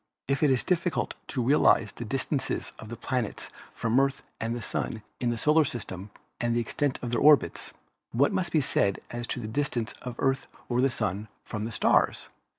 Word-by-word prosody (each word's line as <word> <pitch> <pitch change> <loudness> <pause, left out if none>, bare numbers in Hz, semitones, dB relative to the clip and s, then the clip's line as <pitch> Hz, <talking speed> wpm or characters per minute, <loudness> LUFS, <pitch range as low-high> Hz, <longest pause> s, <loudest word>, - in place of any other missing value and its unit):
If 140 0 0
it 150 - +5
is 130 -2 +2
difficult 175 -1 0
to 125 - -1
realize 115 -5 +4
the 120 - -7
distances 135 +4 -1
of 110 - -9
the 120 - -5
planets 120 -1 -3 0.2
from 115 0 0
the - - +7
Earth 135 0 0 0.2
and 115 +1 -1
the 120 - -4
Sun 110 -2 -3 0.2
in 120 - +1
the 120 - -1
solar 150 +7 +4
system 105 -7 -5 0.3
and 120 -1 +1
the - - +3
extent 130 +4 0
of 120 - -3
their 120 - +1
orbits, 145 - +4 0.4
what 140 +9 +3
must 185 -3 0
be 155 - +3
said 100 -6 +1
as 120 0 -4
to - - -3
the 110 - -5
distance 120 -2 -1
of 125 -2 -6
Earth 135 -1 +1 0.2
or 125 +2 +3
Sun 105 -3 -2 0.2
from 105 0 -4
the 115 - -4
stars? - - +2
120 Hz, 200 wpm, -28 LUFS, 115-140 Hz, 0.4 s, the